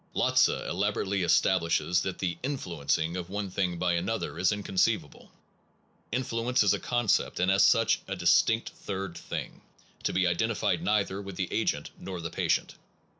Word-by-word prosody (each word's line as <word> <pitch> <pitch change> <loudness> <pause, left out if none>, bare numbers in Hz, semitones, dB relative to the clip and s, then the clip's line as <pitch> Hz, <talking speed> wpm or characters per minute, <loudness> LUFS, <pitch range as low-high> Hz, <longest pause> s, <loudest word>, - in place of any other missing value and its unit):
Lotze - - +4
elaborately 100 +1 -1
establishes 85 0 +2
that 95 - -3
the 90 -3 -2
influencing 85 - -1
of 90 -1 -5
one 100 -1 -4
thing 90 -2 -1
by 90 0 +1
another 90 +1 -2
is 90 - +3
inconceivable. 100 -2 -1 0.8
Influence 120 0 0
is 100 -1 +4
a 100 - -1
concept, 120 -4 0
and, 90 +1 +3
as 95 - +4
such, - - +4
a - - -3
distinct 115 +1 +3
third 95 -3 -5
thing, - - -6 0.4
to - - -1
be 95 0 +1
identified 85 -1 0
neither 100 -2 0
with 100 -2 -8
the 95 -1 -3
agent - - -1
nor 95 -2 -6
the 85 -1 -5
patient. - - 0
95 Hz, 155 wpm, -28 LUFS, 90-105 Hz, 0.8 s, Lotze